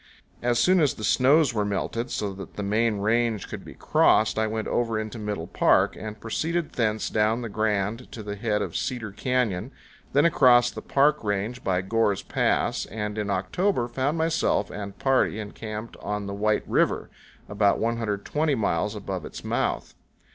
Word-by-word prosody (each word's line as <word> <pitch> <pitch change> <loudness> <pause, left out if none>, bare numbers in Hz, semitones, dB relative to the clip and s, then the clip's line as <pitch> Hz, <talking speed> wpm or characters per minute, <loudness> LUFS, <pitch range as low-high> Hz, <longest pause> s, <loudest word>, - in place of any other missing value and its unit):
As 120 0 +1
soon 185 +10 +4
as 150 -5 +2
the 110 - -8
snows 135 +3 +4
were 105 -2 0
melted, 105 +4 -2
so 100 -4 -2
that 95 0 -10
the 105 - -4
main 110 +2 +1
range 110 0 +1
could - - -7
be - - -11
crossed, 110 0 +3
I 110 - +2
went 110 0 -3
over 115 -2 0
into 110 +1 -4
Middle 105 -5 -3
Park, - - +3
and 110 0 -7
proceeded 160 +9 -2
thence 110 -2 0
down 110 +3 +1
the 115 - -4
Grand 110 +2 -1
to 110 - -7
the 100 0 -5
head 105 -1 0
of - - -6
Cedar 120 -5 -3
Canyon, 120 -1 -1 0.4
then 145 +4 +4
across 120 -6 +5
the - - -7
Park 145 +1 +2
Range 105 +5 -2
by 90 -1 +1
Gore's 105 0 +1
Pass, - - 0
and 105 -1 -4
in 105 -1 -2
October 120 - 0
found 135 +6 -1
myself 160 -10 +1
and 100 -1 -7
party 135 -5 +2
encamped 110 +1 -7
on 105 0 -4
the 100 - -5
White 105 +1 0
River, - - +1 0.4
about 100 -1 +2
120 115 +6 -1
miles 105 -2 0
above 95 -3 -5
its - - -8
mouth. - - -1
110 Hz, 175 wpm, -25 LUFS, 105-120 Hz, 0.4 s, across